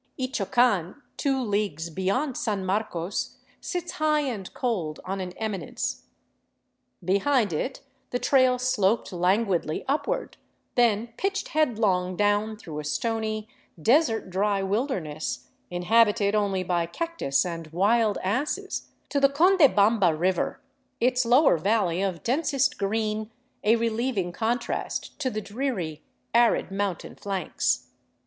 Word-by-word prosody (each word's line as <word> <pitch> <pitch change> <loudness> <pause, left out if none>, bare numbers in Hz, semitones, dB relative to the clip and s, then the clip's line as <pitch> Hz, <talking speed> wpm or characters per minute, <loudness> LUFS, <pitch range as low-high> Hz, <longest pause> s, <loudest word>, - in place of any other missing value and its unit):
Ichocan, 240 - +1 0.2
two 270 -2 0
leagues 200 - -1
beyond 220 - -1
San 205 -6 -2
Marcos, 190 -2 -2 0.2
sits 355 -3 -4
high 305 -1 +1
and 230 -10 -4
cold 185 - -2
on 195 +1 -3
an 180 -1 -4
eminence. 200 -8 -4 1.0
Behind 200 - +2
it 255 - -3 0.3
the 245 - -1
trail 255 -1 +3
sloped 230 -5 +1
languidly 180 -2 +1
upward, 310 - -1 0.4
then 235 -2 +2
pitched 390 0 -1
headlong 210 -11 +1
down 205 +2 +1
through 160 -8 -7
a - - -5
stony, 215 +6 -2 0.3
desert 225 - +2
dry 200 +1 +1
wilderness, 170 - -2 0.2
inhabited 205 +3 +3
only 200 -3 +1
by 175 -2 0
cactus 330 - -1
and 165 -2 -5
wild 205 +6 +2
asses, 290 - -2 0.2
to 285 - +1
the 275 0 +5
Condebamba 240 - +4
river, 185 +3 0 0.4
its 250 +1 +2
lower 245 - +5
valley 190 -2 +1
of 185 -4 -2
densest 275 +1 +1
green 215 +1 -1 0.3
a 220 +2 +5
relieving 230 -4 -1
contrast 235 +9 -2
to 270 -4 0
the 215 -2 -3
dreary, 205 - -3 0.3
arid 235 -4 +3
mountain 195 -3 -3
flanks. 185 - -2
215 Hz, 120 wpm, -26 LUFS, 185-250 Hz, 1.0 s, the